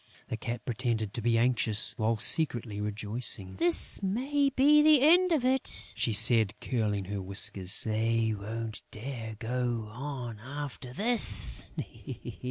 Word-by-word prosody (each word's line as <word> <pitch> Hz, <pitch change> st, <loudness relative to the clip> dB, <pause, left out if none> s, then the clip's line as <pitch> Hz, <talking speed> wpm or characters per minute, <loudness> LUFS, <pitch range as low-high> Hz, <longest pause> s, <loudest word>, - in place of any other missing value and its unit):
The -, -, -3 dB
Cat 120 Hz, +2 st, -7 dB
pretended 115 Hz, -4 st, -3 dB
to 115 Hz, -, -5 dB
be 115 Hz, 0 st, +1 dB
anxious, 115 Hz, -3 st, +1 dB
while 110 Hz, +1 st, -1 dB
secretly 115 Hz, -5 st, +2 dB
rejoicing: 105 Hz, -2 st, -4 dB
"This 175 Hz, -, +5 dB
may 270 Hz, +9 st, -1 dB
be 290 Hz, +3 st, +3 dB
the 305 Hz, -1 st, +5 dB
end 350 Hz, +6 st, +4 dB
of 295 Hz, -7 st, 0 dB
it," 260 Hz, -, -1 dB
she 115 Hz, +2 st, -1 dB
said, 110 Hz, -1 st, +4 dB
curling 105 Hz, -6 st, -3 dB
her 100 Hz, +1 st, -6 dB
whiskers. 100 Hz, 0 st, 0 dB
"They 110 Hz, 0 st, -1 dB
won't 110 Hz, +1 st, -7 dB
dare 115 Hz, -1 st, -8 dB
to 115 Hz, -, -8 dB
go 120 Hz, -3 st, -3 dB
on 125 Hz, -3 st, -7 dB
after 130 Hz, 0 st, -8 dB
this." 210 Hz, -, +3 dB
115 Hz, 140 wpm, -28 LUFS, 105-145 Hz, -, This